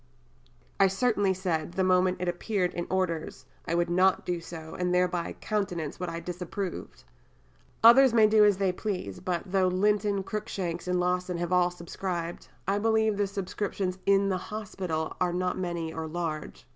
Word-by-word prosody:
I 195 - +7
certainly 205 0 +1
said, 175 -3 -2
the 190 - +1
moment 185 0 +3
it 180 - -1
appeared 180 +1 -1
in 175 - -4
Orders, 165 -8 -2 0.2
I 170 - 0
would 175 0 +2
not 185 +2 +3
do 175 -1 -2
so, 160 -1 -9
and 180 0 0
thereby 180 -1 0
countenance 180 -8 -2
what 180 -1 -3
I 165 0 -4
disapproved. 180 +2 -5 0.8
Others 255 +3 +8
may 225 -2 +6
do 215 0 +5
as 205 -2 +5
they 195 -1 +2
please, 180 - -4
but 175 -2 -2
though 190 -1 +3
Linton, 200 +1 +1
Cruikshanks, 185 -4 -4
and 180 0 +1
Lawson 180 0 0
have 175 +1 -2
all 180 -1 +4
subscribed, 175 0 -5 0.2
I 200 +1 +1
believe 220 0 +2
the 205 0 0
subscriptions 190 -1 -3
in 200 0 +4
the 185 -1 0
hospital 185 -7 -4
are 180 -1 +2
not 180 +1 -1
many 170 -3 -3
or 160 0 -4
large." 155 - -5
180 Hz, 170 wpm, -28 LUFS, 175-200 Hz, 0.8 s, Others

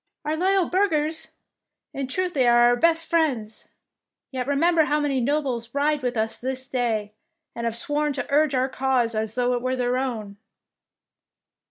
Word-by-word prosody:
^ - - -67
" - - -54
Our - - 0
loyal 375 +2 +2
burghers! 320 -5 0 0.6
In 275 -1 -3
truth 365 +6 -2
they 260 -4 +2
are 240 0 +5
our 245 - +3
best 330 +5 +2
friends. 265 -11 -1 0.6
Yet 255 -1 -3
remember 320 +3 +3
how 300 0 +1
many 280 -3 0
nobles 265 -3 -1
ride 295 +1 +1
with 250 -2 -2
us 220 +1 -2
this 260 +1 -4
day, 220 -5 -1 0.4
and 235 - -5
have 230 0 -2
sworn 295 +4 0
to 265 - -3
urge 295 -1 +3
our 255 +1 +2
cause 260 -3 0
as 220 0 -2
though 250 0 +1
it 245 - -1
were 255 +1 -1
their 250 0 0
own." 220 -6 -4
265 Hz, 180 wpm, -24 LUFS, 240-300 Hz, 0.6 s, are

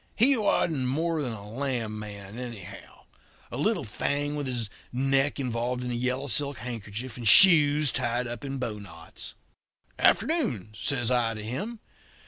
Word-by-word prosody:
he 265 +5 +4
wasn't 165 - +1
more 160 +4 0
than 130 -4 -3
a 105 -2 -8
lamb 115 -3 -3
man, 105 +1 -8
anyhow 95 -6 -9 0.5
a - - -5
little - - +1
thing 145 +1 -2
with 145 -2 -3
his 120 -4 -2 0.2
neck 135 +3 +1
involved 125 -1 -2
in 125 - -3
a - - -2
yellow 125 +3 -1
silk 140 +1 +1
handkerchief, 115 0 -6
and 120 -2 -3
shoes 150 - +8
tied 120 0 0
up 120 +3 -6
in 135 -1 -4
bowknots. 100 -9 -7 0.6
"'Afternoon!' 135 - +1
says 125 +1 -1
I 120 -2 +1
to 105 - -6
him. 205 - -5
125 Hz, 150 wpm, -27 LUFS, 110-145 Hz, 0.6 s, shoes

